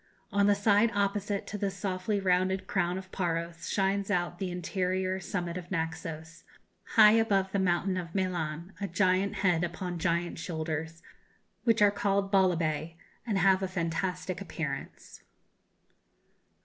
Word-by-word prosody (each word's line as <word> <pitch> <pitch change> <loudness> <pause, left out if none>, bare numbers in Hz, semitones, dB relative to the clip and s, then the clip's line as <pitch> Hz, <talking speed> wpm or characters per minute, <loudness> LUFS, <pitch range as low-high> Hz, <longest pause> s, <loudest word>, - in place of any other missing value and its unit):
On 200 0 +3
the 205 - +5
side 205 +2 +4
opposite 200 0 0
to 210 - -6
the 200 - 0
softly 195 +1 -2
rounded 185 0 +1
crown 175 +1 0
of 185 0 -9
Paros 170 -1 -3
shines 195 0 0
out 175 -2 -1
the 190 - -2
interior 185 +1 -1
summit 175 -2 -3
of 175 -1 -8
Naxos, 160 -1 -4 0.5
high 215 -2 +9
above 200 -4 +2
the 200 - 0
mountain 185 +1 +1
of 170 -2 -5
Melanès, 175 -2 -2
a 200 - -1
giant 190 +2 +1
head 175 -2 +3
upon 175 0 -3
giant 170 +1 -1
shoulders, 160 0 -4 0.6
which 225 -3 +4
are 205 - +6
called 200 -1 0
Bolibay, 165 -4 +1 0.3
and 210 -4 +1
have 190 0 +4
a 190 - 0
fantastic 180 +1 -2
appearance. 155 -7 -6
185 Hz, 140 wpm, -29 LUFS, 170-195 Hz, 0.6 s, high